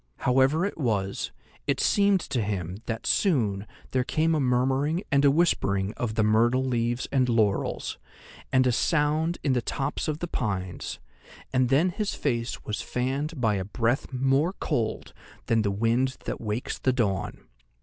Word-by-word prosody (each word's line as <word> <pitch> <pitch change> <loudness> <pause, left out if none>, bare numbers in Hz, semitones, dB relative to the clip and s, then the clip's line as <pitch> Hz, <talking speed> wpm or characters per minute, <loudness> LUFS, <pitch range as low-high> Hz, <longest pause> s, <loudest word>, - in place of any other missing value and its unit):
However 135 +7 +3
it 200 - -4
was, 100 -7 -1 0.4
it - - +1
seemed 200 -2 +3
to 125 -6 -2
him 95 -4 -3
that 115 -1 -4
soon 110 - +1 0.2
there 130 -1 +1
came 160 +5 +1
a 155 - +2
murmuring 135 +6 +1
and 140 0 +4
a 140 - +7
whispering 105 - +1
of 110 -3 -3
the 110 - +2
myrtle 120 +5 +3
leaves 120 -1 -1
and 130 -2 +2
laurels, 110 -4 0 0.5
and 130 0 +4
a 125 - +4
sound 155 +5 +1
in 140 - +2
the 125 - +1
tops 140 +6 -2
of 155 -1 -1
the 175 - -4
pines, 95 - -3 0.6
and 130 -1 +3
then 150 +7 +4
his 210 +3 -2
face 120 -4 -2
was 105 - -3
fanned 135 +5 -2
by 110 -4 +2
a 95 - -2
breath 115 +7 -1
more 135 +7 +2
cold 115 - -2 0.3
than 115 -1 +2
the 105 - 0
wind 115 +6 +1
that - - -4
wakes 110 +2 -3
the 130 - +1
dawn. 105 -7 -1
125 Hz, 165 wpm, -26 LUFS, 110-145 Hz, 0.6 s, a